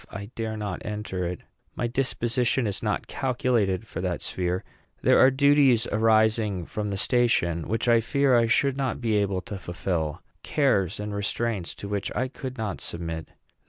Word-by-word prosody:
I 100 +3 -7
dare 110 -1 -3
not 105 -4 -4
enter 105 -4 -3
it. 90 0 -5 0.3
My - - -1
disposition 120 0 0
is 100 -2 -2
not - - -1
calculated 120 -6 0
for 90 - -6
that 90 -2 -2
sphere. 90 0 -2 0.4
There - - +5
are 130 - +8
duties 135 -3 +4
arising 110 -3 +2
from 105 +2 -4
the 100 - -2
station 95 -8 +1
which 115 +3 -1
I 115 -1 +5
fear 140 +2 +2
I 115 -1 +4
should 135 +3 +2
not 135 -3 -1
be 115 -3 0
able 100 -2 0
to 100 0 -7
fulfil, 85 -3 -3 0.2
cares 105 - +1
and 105 0 -4
restraints 100 -1 -2
to 100 - -7
which 100 -1 -2
I 130 +1 0
could 130 -1 -7
not 110 -4 -3
submit. 80 -1 -5
110 Hz, 170 wpm, -26 LUFS, 95-120 Hz, 0.4 s, are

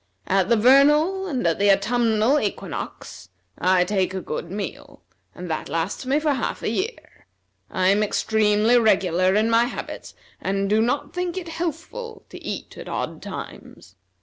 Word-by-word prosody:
At 190 0 +1
the 235 - +5
vernal 295 - +4
and 265 - -2
at 165 +1 +1
the 200 0 +5
autumnal 225 +5 +2
equinox 95 - -5 0.3
I 185 0 +4
take 190 0 -1
a - - -1
good 170 -1 -5
meal, 200 +2 -7 0.3
and 180 - -7
that 155 - -3
lasts 165 - -3
me 280 +3 +2
for 305 -1 +1
half 260 - -3
a - - 0
year. 410 - -5 0.4
I 185 0 +1
am 200 +2 +3
extremely 215 +2 +3
regular 185 -4 +3
in 215 +1 +3
my 230 +1 +4
habits, 245 - -7 0.3
and 195 +1 -1
do 215 +2 +3
not 250 +5 -1
think 360 0 -3
it 350 -3 -5
healthful 350 - -5
to - - -11
eat - - -6
at - - -8
odd - - -4
times. - - -9
220 Hz, 165 wpm, -23 LUFS, 195-285 Hz, 0.4 s, the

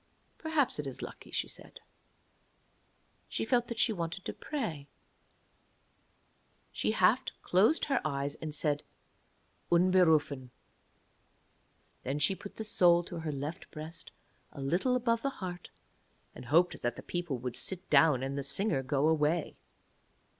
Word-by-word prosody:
'Perhaps 315 - 0
it 145 - -3
is 135 - -6
lucky,' - - -9
she - - -2
said. - - -12 1.5
She 110 - -2
felt 240 - +2
that 235 - -5
she 225 - +3
wanted 170 0 -4
to - - -3
pray. 190 - -4 1.8
She - - 0
half - - +4 0.2
closed 210 - +3
her 275 -3 +1
eyes, 140 -1 -1
and 155 0 -6
said 150 -1 0 0.9
'Unberufen'. 165 -7 +3 1.5
Then 135 +3 -2
she 150 +6 +2
put 200 +1 -10
the 220 - -4
soul 175 -5 +4
to 175 0 -7
her 160 -1 -3
left 145 +4 -5
breast 155 +2 -9 0.4
a - - -11
little 175 - +1
above 230 -2 +1
the 275 - 0
heart, 180 -3 -6 0.6
and - - -10
hoped 165 +7 +3
that 120 0 -1
the - - -9
people 175 -6 -3
would 125 0 -5
sit 185 -2 -2
down 150 -6 +5
and 135 +1 -3
the 140 - -2
singer 140 +2 +1
go 140 +2 +1
away. 160 0 +1
165 Hz, 140 wpm, -31 LUFS, 140-190 Hz, 1.8 s, down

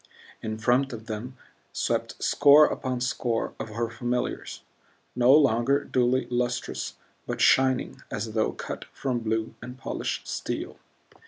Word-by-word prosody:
In 110 0 -4
front 125 +4 +2
of 110 -1 -8
them 115 +4 -6 0.4
swept - - -2
score 145 +1 +7
upon 130 -2 -2
score 125 -2 -1
of - - -5
her 115 +2 -2
familiars 120 +2 -3 0.5
no 125 +1 +5
longer 140 -1 +4
dully 125 0 +1
lustrous, 120 0 -2 0.3
but - - -3
shining 130 -1 +3
as 110 +1 -4
though 110 -1 +1
cut - - -6
from 125 -3 -3
blue 110 -1 -2
and 125 +2 -8
polished 130 - -4
steel. - - -4
120 Hz, 135 wpm, -27 LUFS, 115-130 Hz, 0.5 s, score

